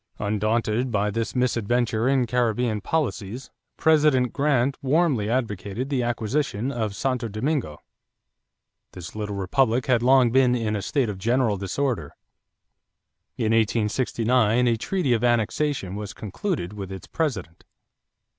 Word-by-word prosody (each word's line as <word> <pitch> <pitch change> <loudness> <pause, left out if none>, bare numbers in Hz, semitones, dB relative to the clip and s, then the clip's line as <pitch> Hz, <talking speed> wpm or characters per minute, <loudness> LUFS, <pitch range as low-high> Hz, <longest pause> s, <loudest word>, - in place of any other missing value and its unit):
Undaunted 110 +3 0
by 105 -2 0
the 115 +2 -2
misadventure 120 -1 +1
in 135 -2 +2
Caribbean 120 -2 0
policies, 125 -6 -3 0.3
President 150 -6 +3
Grant 140 -2 +1
warmly 135 -6 +1
advocated 115 +1 -2
the 130 -3 +1
acquisition 120 +1 -1
of 110 -6 -3
Santo 125 -1 -1
Domingo. 110 - -2 1.1
This 90 +1 -9
little 105 -1 -4
republic 115 +5 +1
had 125 -3 +2
long 125 -1 +5
been 125 -1 +4
in 110 -3 -1
a 105 - -2
state 130 +4 0
of 100 -3 -5
general 115 +1 +1
disorder. 100 - -2 1.2
In 110 -1 0
1869 115 +1 +2
a 115 - +2
treaty 140 - 0
of 115 - 0
annexation 120 -2 0
was 105 -1 -6
concluded 110 - -4
with 100 -2 -7
its 95 - -8
president. 110 - -3
120 Hz, 125 wpm, -24 LUFS, 105-130 Hz, 1.2 s, long